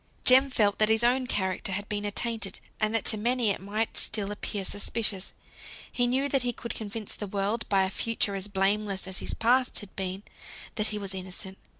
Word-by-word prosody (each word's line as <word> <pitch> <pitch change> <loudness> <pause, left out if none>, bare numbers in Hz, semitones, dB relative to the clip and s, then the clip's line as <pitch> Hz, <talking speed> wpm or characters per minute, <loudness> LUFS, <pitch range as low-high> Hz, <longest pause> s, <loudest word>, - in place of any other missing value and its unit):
Jem 265 +2 +7
felt 210 -5 +2
that 215 0 +5
his 220 +1 +3
own 250 +1 +3
character 190 -2 -1
had 205 +1 -3
been 210 -1 -2
attainted; 205 -1 -1 0.2
and 215 +1 +1
that 225 - +1
to 220 - +5
many 235 0 +2
it - - -4
might 210 +3 -2
still 205 -2 +2
appear 205 -1 -3
suspicious. 205 -1 +1 0.6
He 245 -1 +2
knew 265 +3 +1
that 275 -1 +1
he 245 0 -1
could 235 - -5
convince 215 -1 -6
the 205 - -6
world, 200 +4 -1
by 195 -1 +4
a 190 - -1
future 225 -1 0
as 195 0 -2
blameless 200 0 0
as 190 0 -2
his - - -3
past 250 +3 +2
had 205 - -6
been, 190 +1 -4 0.5
that 215 0 +1
he 210 - -2
was 195 -2 -3
innocent. 190 +1 -7
210 Hz, 205 wpm, -28 LUFS, 195-230 Hz, 0.6 s, Jem